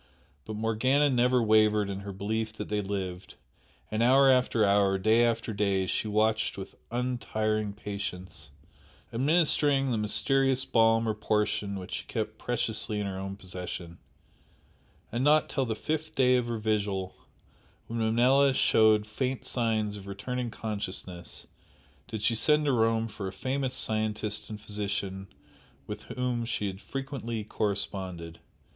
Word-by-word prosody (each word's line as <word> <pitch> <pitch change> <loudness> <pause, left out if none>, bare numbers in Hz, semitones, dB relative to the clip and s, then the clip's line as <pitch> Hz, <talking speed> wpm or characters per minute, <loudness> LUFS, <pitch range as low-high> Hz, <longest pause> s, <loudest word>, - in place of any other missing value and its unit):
But 110 - -5
Morgana 130 +7 +2
never 125 0 +3
wavered 105 -1 +4
in 100 -1 -4
her 100 0 -7
belief 110 +3 -3
that - - -7
they 105 0 0
lived, 95 -2 -5 0.6
and 110 +1 0
hour 135 +3 +6
after 125 -4 +3
hour, 100 -1 +3
day 110 +4 +4
after 115 -1 0
day 100 -2 +1
she 100 - -1
watched 110 +1 +1
with 95 - -7 0.2
untiring 110 -4 -1
patience, 95 -6 -6 0.6
administering 145 0 +3
the 115 - 0
mysterious 135 +5 +2
balm 115 0 +3
or 110 - +1
portion 105 -1 -1
which 90 -1 -8
she - - -4
kept - - -4
preciously 105 -1 -1
in 105 - -2
her 95 -1 -4
own 95 0 -5
possession, 90 -2 -7 1.1
and 120 +3 -1
not 150 +2 +4
till 135 -2 0
the 110 -2 -2
fifth 155 +7 -3
day 125 -1 +4
of 125 -1 +1
her 120 -1 -2
vigil, 100 -3 -1 0.7
when 115 0 -4
Manella 125 +5 +4
showed 110 -3 +4
faint 125 +4 -3
signs 110 -4 0
of 100 -1 -11
returning 120 +5 -4
consciousness, 95 -5 -5 0.6
did 110 -3 -5
she - - +4
send 150 +6 +4
to 145 - +3
Rome 115 -2 +2
for 100 -3 -6
a - - -4
famous 130 +3 -2
scientist 110 -3 -1
and 105 -1 -6
physician 100 -2 -3 0.6
with 105 0 -7
whom 125 -2 -2
she 115 -3 -2
had 95 0 -5
frequently 135 -5 -4
corresponded. 95 -5 -3
110 Hz, 145 wpm, -29 LUFS, 100-125 Hz, 1.1 s, hour